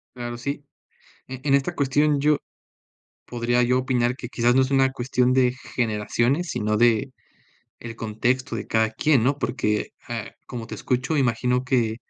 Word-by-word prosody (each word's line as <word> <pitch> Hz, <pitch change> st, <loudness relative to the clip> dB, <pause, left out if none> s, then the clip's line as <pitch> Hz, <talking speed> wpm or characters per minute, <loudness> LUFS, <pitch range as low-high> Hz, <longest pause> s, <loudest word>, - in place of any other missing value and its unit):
Claro, 120 Hz, -1 st, -5 dB
sí. 140 Hz, +3 st, -5 dB, 0.6 s
En 130 Hz, 0 st, -8 dB
en 140 Hz, -, +2 dB
esta 140 Hz, +5 st, 0 dB
cuestión 145 Hz, +1 st, +2 dB
yo, 150 Hz, +1 st, +3 dB, 0.9 s
podría 120 Hz, 0 st, 0 dB
yo 125 Hz, +1 st, +2 dB
opinar 125 Hz, -1 st, 0 dB
que 125 Hz, -, -7 dB
quizás 120 Hz, 0 st, +2 dB
no 130 Hz, -, +5 dB
es 130 Hz, +1 st, 0 dB
una 135 Hz, -1 st, +3 dB
cuestión 125 Hz, -1 st, +1 dB
de 125 Hz, -1 st, +3 dB, 0.2 s
generaciones, 120 Hz, +7 st, 0 dB
sino 105 Hz, 0 st, 0 dB
del 120 Hz, +3 st, +2 dB, 0.8 s
contexto 120 Hz, +4 st, -1 dB
de -, -, -5 dB
cada 110 Hz, 0 st, +1 dB
quien, 135 Hz, +3 st, +2 dB
¿no?, 140 Hz, +2 st, +1 dB
porque, 105 Hz, -6 st, -1 dB, 0.2 s
ah, 115 Hz, -2 st, -4 dB, 0.2 s
como 120 Hz, -3 st, -6 dB
te -, -, -7 dB
escucho, 130 Hz, +5 st, -1 dB
imagino 125 Hz, -1 st, +1 dB
que 120 Hz, -4 st, +1 dB
125 Hz, 160 wpm, -24 LUFS, 120-135 Hz, 0.9 s, no